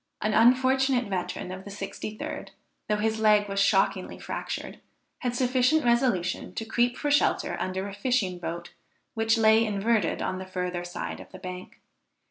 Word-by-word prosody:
An 215 - 0
unfortunate 260 +2 +4
veteran 185 -2 -3
of 190 +1 -7
the 205 - -9
63d, 200 +2 -6 0.4
though 210 - +3
his 220 +1 0
leg 210 -1 +4
was 195 0 -2
shockingly 200 -1 +2
fractured, - - -5 0.4
had 245 -1 -2
sufficient 255 +4 +2
resolution 235 -7 +1
to 225 - -3
creep 240 +2 +1
for 290 - -1
shelter 290 - +2
under 190 +1 -2
a 200 - -7
fishing 200 -4 0
boat 170 0 -6 0.4
which 225 +1 +2
lay 220 0 +5
inverted 210 -1 +1
on 185 - -2
the 190 - -7
further 180 -1 -3
side 175 - -5
of - - -12
the - - -9
bank. 180 0 -8
215 Hz, 160 wpm, -27 LUFS, 185-245 Hz, 0.4 s, lay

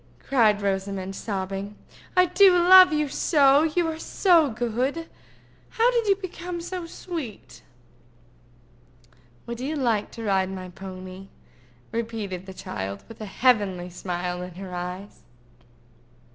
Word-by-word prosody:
cried 215 -6 +2
Rosamond, 195 -1 -2
sobbing. 195 0 -4 0.4
"I 365 - +7
do 365 +2 +6
love 370 +1 +8
you 300 -1 +1
so, 280 0 +4
you 325 +2 +1
are 320 0 -4
so 335 -4 +3
good. 245 +8 -2 0.6
How 470 +2 +2
did 470 -3 0
you 395 - +5
become 360 -2 -6
so 350 0 -6
sweet?" 225 - -8 1.8
"Would 235 0 -6
you 280 +5 -3
like 235 -7 0
to 230 - -7
ride 190 -3 +1
my 185 -1 -7
pony?" 185 +1 -9 0.6
repeated 220 -5 -4
the 190 - -8
child, 100 - -6
with 225 - -12
a 215 - -5
heavenly 195 -6 +1
smile 180 0 -4
in 180 -1 -8
her 185 0 -8
eyes. 180 +3 -6
220 Hz, 130 wpm, -25 LUFS, -, 1.8 s, love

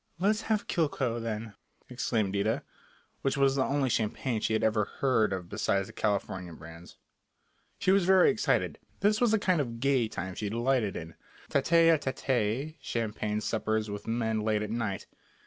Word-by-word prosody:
"Let's 210 +5 +2
have 215 -2 +1
Cliquot, 130 -7 0
then," 110 -1 -4 0.3
exclaimed 110 -5 -1
Ida, 105 +3 0 0.6
which 135 +1 0
was 135 -1 +3
the 135 - +2
only 140 0 +1
champagne 115 0 -1
she 110 - 0
had 110 - +1
ever 110 -1 +2
heard 125 -6 +1
of 95 -2 -3
besides 95 +2 0
the - - -12
California 95 -4 -2
brands. 80 +2 -12 0.8
She 185 - +2
was 195 -1 +4
very 190 +2 +6
excited. 215 - 0 0.2
This 210 +2 +3
was 240 - +4
the 220 - +4
kind 185 -6 +2
of 115 -4 -5
"gay" 130 -3 +2
time 95 -3 -5
she 105 +3 -3
delighted 120 -2 0
in, 80 0 -7 0.4
tête 165 +4 +5
à 160 - +2
tête 130 +2 -1
champagne 110 -4 -2
suppers 110 -1 -1
with 100 0 -7
men 110 -1 0
late 105 0 +1
at 105 - -4
night. 110 -5 -2
115 Hz, 170 wpm, -29 LUFS, 105-140 Hz, 0.8 s, very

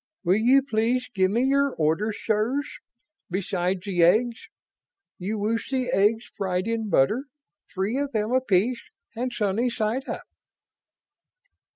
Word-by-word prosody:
Will 185 +2 +3
you 255 +5 +4
please 250 0 0
give 190 -2 +2
me 230 +5 +1
your 275 0 +2
orders, 180 +8 0
sirs, 240 +8 -1 0.5
besides 185 0 -1
the 185 -4 0
eggs? 225 +8 +3 0.7
You 200 +4 -3
wish 220 +3 -1
the 255 -2 -1
eggs 220 +2 +2
fried 185 -1 -1
in 225 -2 -2
butter 215 - +2 0.5
three 205 +7 -1
of 285 -1 -2
them 215 -1 -1
apiece 245 -2 +2 0.3
and 250 +2 -2
sunny 225 +1 0
side 235 +4 -2
up." - - -4
220 Hz, 135 wpm, -25 LUFS, 195-250 Hz, 0.7 s, you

